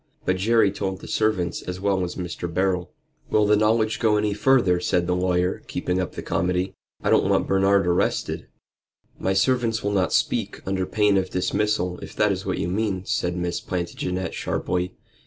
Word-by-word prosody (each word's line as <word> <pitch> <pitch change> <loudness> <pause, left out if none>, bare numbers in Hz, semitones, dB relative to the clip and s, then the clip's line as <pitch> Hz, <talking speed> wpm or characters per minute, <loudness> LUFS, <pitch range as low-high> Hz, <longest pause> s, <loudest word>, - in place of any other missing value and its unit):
But 95 - +1
Jerry 110 +1 +3
told 95 -1 -3
the - - -10
servants 95 -6 0
as 90 0 -6
well 95 -1 +1
as 90 0 -4
Mr. 90 -1 -5
Beryl." 90 0 0 0.4
"Will 105 -1 +3
the 105 +1 +4
knowledge 110 +1 +2
go 110 -2 +3
any 105 0 +1
further?" 105 -6 +3
said 90 0 +1
the 90 +1 0
lawyer, 90 0 0
keeping 90 +1 -1
up 90 - -4
the - - -6
comedy. 90 +1 0 0.3
"I - - +1
don't - - +4
want - - +2
Bernard 95 0 +3
arrested." 90 0 0 0.7
"My 95 - 0
servants 115 +2 +1
will 100 - 0
not 95 -2 +1
speak - - 0
under 95 -1 -1
pain 105 -2 +3
of 95 -1 0
dismissal, 90 -1 0
if - - -10
that - - +3
is - - -3
what - - -1
you - - -1
mean," 95 0 -1
said 90 -2 -1
Miss 85 0 -2
Plantagenet, 90 +1 -3
sharply. 90 0 -2
95 Hz, 185 wpm, -24 LUFS, 90-105 Hz, 0.7 s, the